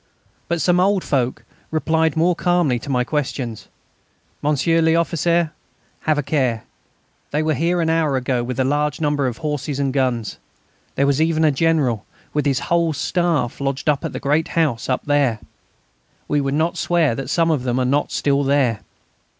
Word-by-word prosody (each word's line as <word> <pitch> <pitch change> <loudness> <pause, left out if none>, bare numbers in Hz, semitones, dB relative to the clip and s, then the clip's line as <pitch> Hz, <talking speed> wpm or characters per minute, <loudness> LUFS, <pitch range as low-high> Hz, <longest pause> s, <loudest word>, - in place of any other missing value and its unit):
But 170 0 -1
some 180 +2 +3
old 190 0 +2
folk 130 -3 -1 0.2
replied 160 0 +1
more 175 +2 +3
calmly 175 -9 +1
to 115 - -9
my 125 -2 +1
questions: 130 -5 -3 0.7
"Monsieur 150 +3 +2
l'Officier, 165 0 +2 0.5
have 155 -1 0
a 145 - 0
care. 130 -6 0 0.7
They 150 +2 0
were 155 0 +1
here 170 +5 0
an 160 - 0
hour 155 -4 +1
ago 125 -1 -1
with 125 +1 -4
a - - +3
large 145 +2 0
number 145 -3 +1
of 120 - -4
horses 150 -2 -3
and 135 -2 0
guns. 125 -5 -1 0.6
There 140 - +2
was 140 +1 +2
even 160 0 +2
a 155 - +4
general, 140 -7 +1 0.3
with 150 -1 0
his 135 -2 +1
whole 170 -2 +1
staff, 165 -5 -1
lodged 135 +1 -2
at 145 -2 +2
the - - -5
great 150 +3 +1
house 140 -9 +1
up 130 - -1
there.... 145 -6 +2 0.9
We 145 -1 +1
would 135 0 -1
not 160 +3 0
swear 170 -7 +2
that 135 +3 -5
some 165 -1 +2
of 150 -5 0
them 125 -1 -1
are 130 - +1
not 140 +3 +1 0.2
there 140 -3 +2
still." - - -28
145 Hz, 175 wpm, -20 LUFS, 130-160 Hz, 0.9 s, a